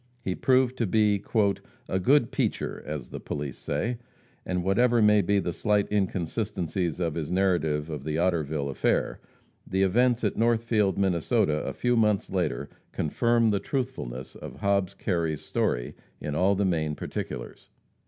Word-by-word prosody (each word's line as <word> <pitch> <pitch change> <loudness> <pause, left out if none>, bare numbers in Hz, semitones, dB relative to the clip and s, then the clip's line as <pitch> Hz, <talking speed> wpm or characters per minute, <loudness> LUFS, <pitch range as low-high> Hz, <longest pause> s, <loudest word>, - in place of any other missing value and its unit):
He 95 - -2
proved 130 +3 +2
to 115 - +1
be 105 0 +2 0.6
"a 95 - 0
good 130 +5 +3
peacher," - - -1
as 75 -5 -5
the - - -5
police 70 -1 -5
say, 120 +1 -2 0.5
and 90 -1 -1
whatever 120 +6 +3
may 105 -1 +5
be 100 +2 +1
the 85 -3 -1
slight 105 +1 +1
inconsistencies 90 -3 -1
of 85 -3 0
his 80 -2 -3
narrative 85 -6 +1
of 75 -4 -5
the 75 +1 -2
Otterville 80 -5 0
affair, - - 0 0.5
the 95 0 +1
events 120 +5 +3
at 105 - +1
Northfield, 115 -4 +2
Minnesota, 85 -5 +1
a - - -3
few 120 0 +1
months 105 -4 +2
later, - - -1 0.2
confirm 115 +7 +2
the 100 - +1
truthfulness 95 - -4
of - - -9
Hobbs 100 -1 0
Kerry's 85 -6 -1
story - - -1 0.3
in 75 0 -4
all 95 +6 +3
the 100 +1 +1
main 80 -4 0
particulars. - - -6
95 Hz, 155 wpm, -27 LUFS, 80-110 Hz, 0.6 s, may